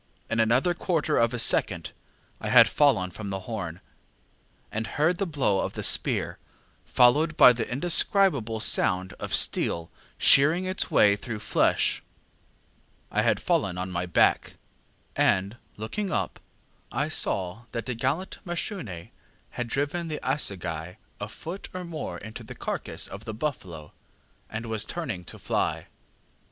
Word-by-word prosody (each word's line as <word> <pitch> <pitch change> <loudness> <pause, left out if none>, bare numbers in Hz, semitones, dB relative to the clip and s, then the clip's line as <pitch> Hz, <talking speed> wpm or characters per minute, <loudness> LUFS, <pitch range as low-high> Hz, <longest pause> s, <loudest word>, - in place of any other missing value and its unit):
In 115 - +1
another 125 +10 +3
quarter 170 -3 -1
of 115 0 +3
a 125 - -3
second 115 - +2 0.5
I - - -4
had - - +8
fallen 115 -11 +2
from 100 +3 -7
the 95 -1 -4
horn, 95 -6 -6 0.9
and 110 +1 -3
heard 165 +4 0
the 195 - -1
blow 130 - +1
of - - -2
the - - -5
spear, - - +2 0.4
followed 150 +6 +3
by 125 - +8
the 115 -1 -4
indescribable 140 - +2
sound 95 -2 +2
of - - -6
steel 85 0 +2 0.3
shearing 155 +7 +5
its 185 0 -1
way 100 -1 +5
through 110 +1 -6
flesh. - - +1 1.1
I - - +1
had - - +2
fallen 90 -2 0
on 90 +1 -4
my 90 0 -3
back, 85 - +2 0.6
and, 100 +5 +1 0.2
looking 190 - -4
up, - - -2 0.5
I - - -1
saw 95 +4 -1
that 115 - -4
the 125 - -3
gallant 135 +11 -2
Mashune 170 - -5 0.4
had 120 - -4
driven 145 +7 -2
the 155 -2 -4
assegai 90 - -2 0.2
a - - -5
foot 180 +5 -8
or 185 - -4
more 165 -3 -6
into 110 +1 -9
the - - -10
carcass - - -4
of 100 +2 -10
the 110 - -6
buffalo, 95 - -5 0.6
and 110 +2 -5
was 110 -2 0
turning 110 - -5
to - - -9
fly. - - -2
115 Hz, 145 wpm, -26 LUFS, 95-155 Hz, 1.1 s, had